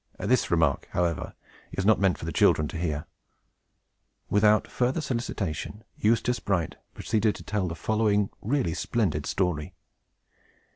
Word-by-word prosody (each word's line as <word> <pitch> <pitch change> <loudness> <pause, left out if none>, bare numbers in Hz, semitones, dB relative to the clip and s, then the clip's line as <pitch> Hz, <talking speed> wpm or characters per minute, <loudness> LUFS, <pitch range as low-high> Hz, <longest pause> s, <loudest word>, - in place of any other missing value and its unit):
This 125 +4 +1
remark, 80 -5 +2
however, 85 -2 -1 0.4
is 95 - -2
not 110 +1 +5
meant 95 -2 +2
for - - -7
the - - -3
children 75 - +3
to - - -5
hear. 75 -4 -2 1.3
Without 105 +1 +4
further 125 +5 0
solicitation, 110 - -3
Eustace 115 +3 +1
Bright 90 -6 -1 0.2
proceeded 110 0 +1
to - - -10
tell 100 -3 -1
the 85 - -4
following 105 +2 +1
really 125 - 0
splendid 90 -4 -1
story. 90 -6 -1
100 Hz, 135 wpm, -27 LUFS, 85-110 Hz, 1.3 s, not